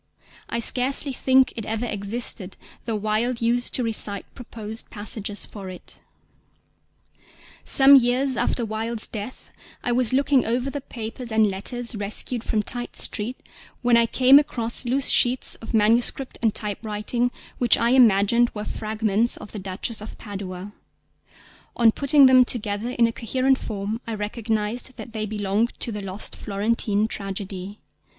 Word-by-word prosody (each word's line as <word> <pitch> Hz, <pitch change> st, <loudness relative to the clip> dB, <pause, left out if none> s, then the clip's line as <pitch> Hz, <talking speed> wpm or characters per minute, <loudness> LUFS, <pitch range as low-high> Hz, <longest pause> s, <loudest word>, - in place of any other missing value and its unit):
I -, -, -2 dB
scarcely 260 Hz, +4 st, +1 dB
think 260 Hz, 0 st, +3 dB
it 225 Hz, -, -4 dB
ever 225 Hz, +3 st, -3 dB
existed, 205 Hz, -2 st, -3 dB, 0.3 s
though 225 Hz, -, -2 dB
Wilde 215 Hz, +3 st, -1 dB
used 240 Hz, +1 st, +1 dB
to 250 Hz, -, +1 dB
recite 210 Hz, -3 st, +1 dB
proposed 225 Hz, -3 st, -3 dB
passages 205 Hz, 0 st, -4 dB
for 195 Hz, -3 st, -9 dB
it. 185 Hz, -, -11 dB, 1.6 s
Some 275 Hz, +1 st, +7 dB
years 260 Hz, +1 st, +3 dB
after 235 Hz, 0 st, 0 dB
Wilde's 220 Hz, +1 st, 0 dB
death 215 Hz, +3 st, -8 dB, 0.3 s
I 245 Hz, -, 0 dB
was 245 Hz, -1 st, +3 dB
looking 275 Hz, 0 st, +3 dB
over 245 Hz, +4 st, -1 dB
the 285 Hz, -, -5 dB
papers 235 Hz, 0 st, -7 dB
and 220 Hz, 0 st, +4 dB
letters 240 Hz, +6 st, -2 dB
rescued 215 Hz, +3 st, -2 dB
from 215 Hz, -2 st, -1 dB
Tite 240 Hz, +3 st, -4 dB
Street 230 Hz, +5 st, -1 dB, 0.5 s
when 245 Hz, -1 st, +4 dB
I 235 Hz, 0 st, +4 dB
came 260 Hz, +4 st, +6 dB
across 240 Hz, -5 st, -3 dB
loose 260 Hz, +3 st, +1 dB
sheets 245 Hz, +1 st, +4 dB
of 225 Hz, -, -7 dB
manuscript 230 Hz, +4 st, +2 dB
and 225 Hz, -3 st, +1 dB
typewriting, 215 Hz, +3 st, -2 dB, 0.3 s
which 240 Hz, -2 st, +5 dB
I 235 Hz, +1 st, +1 dB
imagined 235 Hz, -1 st, +4 dB
were 210 Hz, 0 st, -4 dB
fragments 220 Hz, +1 st, +1 dB
of 210 Hz, -, -11 dB
The 210 Hz, -, -6 dB
Duchess 195 Hz, +4 st, -3 dB
of 215 Hz, -, -9 dB
Padua; 195 Hz, -1 st, -7 dB, 1.0 s
on 230 Hz, -2 st, +5 dB
putting 280 Hz, +3 st, +4 dB
them 260 Hz, -1 st, +7 dB
together 220 Hz, -2 st, -2 dB
in 240 Hz, -2 st, +2 dB
a 230 Hz, -, 0 dB
coherent 260 Hz, +4 st, 0 dB
form 210 Hz, +2 st, -4 dB
I 225 Hz, -, -3 dB
recognised 220 Hz, +3 st, -2 dB
that 230 Hz, -, -9 dB
they 215 Hz, -1 st, -3 dB
belonged 210 Hz, +2 st, -1 dB
to 235 Hz, -, 0 dB
the 210 Hz, -1 st, -5 dB
lost 195 Hz, +1 st, -4 dB
Florentine 210 Hz, 0 st, 0 dB
Tragedy. 195 Hz, -1 st, -6 dB
225 Hz, 150 wpm, -23 LUFS, 210-245 Hz, 1.6 s, Some